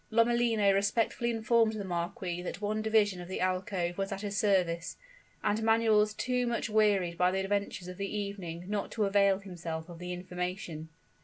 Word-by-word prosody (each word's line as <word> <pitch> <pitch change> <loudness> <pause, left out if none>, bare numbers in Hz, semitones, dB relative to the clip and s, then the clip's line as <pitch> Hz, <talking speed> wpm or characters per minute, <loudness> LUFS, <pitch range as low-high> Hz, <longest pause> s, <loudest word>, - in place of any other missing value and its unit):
Lomellino 230 -3 +3
respectfully 215 +4 +1
informed 225 0 +2
the 210 -2 -4
marquis 175 0 -3
that 180 0 -5
one 215 +1 -1
division 215 -4 +2
of 175 - -8
the 185 - -4
alcove 185 -1 -1
was 195 +1 -2
at 195 0 -4
his 205 -1 -4
service; 180 -5 +1 0.5
and 210 +2 +1
Manuel 225 -1 +4
was 210 0 +1
too 250 0 0
much 235 -2 -1
wearied 200 -5 +2
by 180 0 +5
the 190 +1 0
adventures 200 -2 -2
of 180 0 -8
the 200 0 -3
evening 195 -5 -4
not 205 0 -2
to 215 - +1
avail 200 -1 +4
himself 175 -4 -6
of 170 -1 -10
the 180 0 -5
information. 180 -3 -5
200 Hz, 180 wpm, -31 LUFS, 180-215 Hz, 0.5 s, by